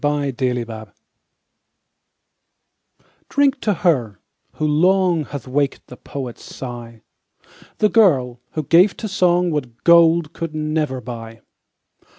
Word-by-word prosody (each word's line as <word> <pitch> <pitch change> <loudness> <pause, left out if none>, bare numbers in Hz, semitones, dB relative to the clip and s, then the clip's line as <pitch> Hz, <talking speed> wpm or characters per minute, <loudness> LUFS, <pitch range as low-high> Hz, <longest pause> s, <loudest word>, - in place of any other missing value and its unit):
DRINK 145 -2 0
TO 130 - +1 0.2
HER. 110 -2 -10 2.4
Drink 280 -2 +2
to 210 - +1
her, 120 - +1 0.3
who 155 - -3
long, 175 +1 +2
Hath 135 -3 -8
waked 140 +1 -1
the 125 - -12
poet's 130 -4 -7
sigh. 120 -3 -9 0.7
The 210 - +3
girl, 135 - +3
who 155 - -2
gave 180 +7 +4
to 220 - -4
song 180 -2 +2
What 125 -7 -5
gold 170 -1 +5
could 165 -2 -5
never 155 -4 -2
buy. 115 -1 -9
150 Hz, 120 wpm, -20 LUFS, 125-170 Hz, 2.4 s, gold